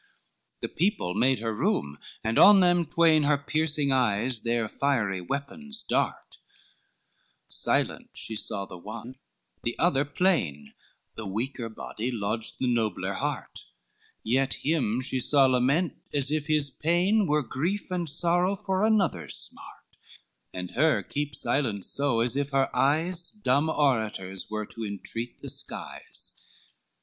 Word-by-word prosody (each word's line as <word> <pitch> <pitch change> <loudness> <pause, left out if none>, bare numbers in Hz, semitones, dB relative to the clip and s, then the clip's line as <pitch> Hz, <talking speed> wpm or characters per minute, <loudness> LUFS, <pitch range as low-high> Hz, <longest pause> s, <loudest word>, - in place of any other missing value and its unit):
XLII - - -39
The - - -3
people 165 - +1
made 125 +4 +2
her 115 -1 -1
room, 70 -8 -1 0.2
and 110 +1 +1
on 205 -1 +9
them 175 -2 +4
twain 165 -1 +4
Her 145 0 +3
piercing 150 0 0
eyes 120 -2 +2
their 115 -1 0
fiery 110 -9 0
weapons 145 - -4
dart, - - -1 1.1
Silent - - 0
she 110 - -4
saw 100 -2 -2
the 90 - -10
one, 115 +6 -8 0.4
the 120 - -3
other 145 -5 +3
'plain, 145 - 0 0.4
The 110 - -6
weaker 115 +4 -3
body 110 +1 -5
lodged 110 -1 -2
the - - -1
nobler 115 -6 0
heart: - - -4 0.6
Yet 130 +4 +1
him 135 -7 +1
she 130 0 -1
saw 140 +2 +4
lament, 135 +7 +2 0.2
as 140 0 +4
if 150 -1 -1
his 150 -3 +1
pain 180 - +2
Were 150 0 +2
grief 180 +11 -2
and 175 -3 -2
sorrow 175 +5 +2
for 190 0 -1
another's 215 -4 +1
smart, - - -8 0.5
And 90 -1 -6
her 155 +4 +2
keep 145 0 -3
silence 110 -9 0
so, 140 -5 +1
as 120 +1 +1
if 140 0 0
her 135 -1 +1
eyes 165 +5 +1
Dumb 155 - +1
orators 110 -11 0
were 110 0 -3
to 115 +2 -8
entreat 110 +3 -5
the - - -5
skies. - - -6
135 Hz, 140 wpm, -27 LUFS, 115-160 Hz, 1.1 s, on